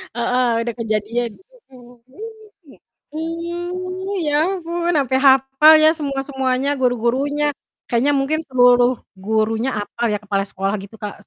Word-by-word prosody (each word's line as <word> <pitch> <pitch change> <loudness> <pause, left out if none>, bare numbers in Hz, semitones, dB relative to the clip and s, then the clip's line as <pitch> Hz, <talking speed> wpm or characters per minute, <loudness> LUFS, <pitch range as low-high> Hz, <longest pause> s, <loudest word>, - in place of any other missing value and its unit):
Heeh, 245 +1 +1
ada 235 - -3
kejadian, 225 +1 -2
gitu, - - -28 0.2
mmm, 245 -1 -16
mhm, 405 +12 -12 0.4
mmm. 270 - -16 0.3
Mmm, 350 +4 -5
ya 295 - 0 0.2
ampun, 345 0 -2
ampe 260 -1 0
hapal 270 +4 +6
ya 310 - +7
semua-semuanya, 270 -2 -2
guru-gurunya. 260 +4 0 0.4
Kayaknya 245 +5 +1
mungkin 305 +4 0
seluruh 245 -1 +4 0.2
gurunya 220 +3 0
hapal 205 +4 -4
ya, - - 0
kepala 200 -1 -1
sekolah 195 +1 -3
gitu, 200 +3 -13
Kak, 210 -1 -5
260 Hz, 135 wpm, -19 LUFS, 235-310 Hz, 0.4 s, ya